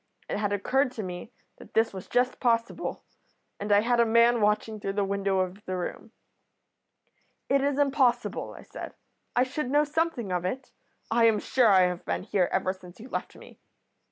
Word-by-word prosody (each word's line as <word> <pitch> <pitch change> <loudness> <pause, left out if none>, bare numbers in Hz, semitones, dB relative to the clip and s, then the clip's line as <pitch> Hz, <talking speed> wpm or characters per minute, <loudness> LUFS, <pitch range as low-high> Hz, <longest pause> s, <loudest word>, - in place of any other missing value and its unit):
It - - -2
had 205 -1 -1
occurred 255 +7 +1
to 220 - -5
me 180 +4 -7 0.3
that - - -15
this 225 -1 +3
was 190 -1 -8
just 245 +1 +1
possible, 230 -1 -1 0.6
and 205 +1 -3
I 205 0 +6
had 240 +2 +1
a - - +7
man 235 +1 +4
watching 210 +1 +1
through 195 -1 -3
the 205 - +3
window 195 -1 0
of 185 +3 -4
the 185 0 -3
room.' 180 +5 -5 1.4
"'It 275 0 +3
is 280 0 0
impossible,' 275 -3 +1
I - - -11
said. - - -9 0.4
'I 245 - +5
should 260 +1 -3
know 295 +2 +4
something 300 - -1
of 180 -1 -1
it. 250 +8 -4 0.4
I 230 0 +4
am 225 -2 +5
sure 245 +3 +2
I 195 -3 +6
have 180 -1 0
been - - -2
here 190 -3 +1
ever 185 0 0
since 180 0 -15
you 245 +4 -11
left - - -4
me. - - -15
220 Hz, 190 wpm, -27 LUFS, 195-250 Hz, 1.4 s, a